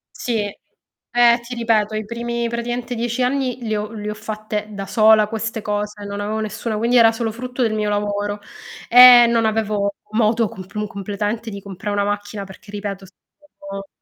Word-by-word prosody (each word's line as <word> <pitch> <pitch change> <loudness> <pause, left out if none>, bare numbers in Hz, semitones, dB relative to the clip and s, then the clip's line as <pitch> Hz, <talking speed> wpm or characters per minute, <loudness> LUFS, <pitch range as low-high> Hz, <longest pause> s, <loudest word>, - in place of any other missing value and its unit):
Sì. 230 -3 -1 0.7
Eh, 240 0 +5
ti 245 +1 -8
ripeto 220 -2 +1
i 215 -1 -3
primi 235 +1 -3
praticamente 240 +1 -3
10 240 +2 -1
anni 255 -1 0
li 220 -1 -1
ho 210 +1 -3
le 210 -1 -5
ho - - -3
fatte 215 0 -5
da 195 -1 -5
sola 215 +1 +5
queste 225 0 -4
cose, 210 0 -3
non 200 0 -5
avevo 215 +1 -2
nessuno, 215 +1 -3
quindi 235 +3 +2
era 225 -1 +7
solo 225 -1 -2
frutto 250 +2 -4
del 220 -2 +1
mio 210 -1 -1
lavoro 205 0 -2 0.5
e 245 0 +10
non 230 -1 +2
avevo 210 -2 -1 0.2
modo 220 0 +2
comp 190 0 -11
mu 210 0 -1
completamente 205 +3 -4
di 200 -1 -7
compra 200 +2 -6
una 205 0 +1
macchina 205 0 -3
perché 190 +2 -14
ripeto 200 -2 -5
stavo 195 -3 -12
215 Hz, 180 wpm, -20 LUFS, 205-235 Hz, 0.7 s, e